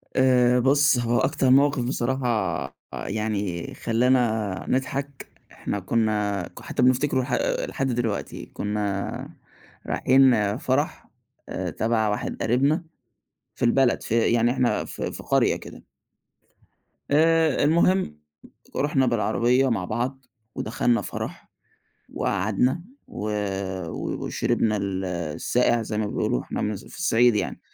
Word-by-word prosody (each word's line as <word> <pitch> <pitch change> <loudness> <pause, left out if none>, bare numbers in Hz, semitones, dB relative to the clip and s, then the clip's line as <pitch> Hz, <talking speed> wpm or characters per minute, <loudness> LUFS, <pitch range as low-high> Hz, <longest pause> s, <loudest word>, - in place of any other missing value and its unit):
آآ 125 -1 +4
بُص، 140 +2 +4
هو 120 0 +1
أكتر 130 - +1
موقِف 140 0 +4
بصراحة 130 +1 -1 0.7
يعني 100 -5 -3
خلّانا 115 -5 +1
نضحك، 135 +1 -2 0.2
إحنا 100 - -4
كُنّا 105 -2 0
ك - - -13
حتّى - - -3
بنفتكره 130 +1 +3
لح 125 - -4 0.4
لحد 135 - -2
دلوقتي. 115 -5 -2
كُنّا 105 -1 -3 0.6
رايحين 125 -6 +3
فَرَح 145 +1 -1 0.4
آآ - - -3
تَبَع 110 -1 0
واحد 105 - -3
قريبنا 140 - +2 0.7
في - - -2
البلد 125 +1 +3
في 115 +1 +1
يعني 120 0 +3
إحنا 125 -1 +1
في - - -5
في - - -8
قرية - - +2
كده. - - -11 1.3
آآ 160 -1 +3
المهم، 170 - +2 0.6
رُحنا 140 -1 +2
بالعربية 120 +2 +2
مع 100 -6 -1
بعض 125 +6 -3 0.3
ودخلنا 115 +1 0
فَرَح - - -6 0.7
وقعدنا 105 - 0 0.3
و - - -7 0.7
و - - -4
وشربنا 105 -1 0
ال 95 -1 -2
الساقع 90 +7 0
زي 105 -1 -4
ما 110 - 0
بيقولوا، 80 -10 -1
إحنا - - -4
من 105 - -1
الص 100 - -7
في - - -13
الصعيد 120 -9 +3
يعني، - - -3
120 Hz, 120 wpm, -24 LUFS, 105-130 Hz, 1.3 s, آآ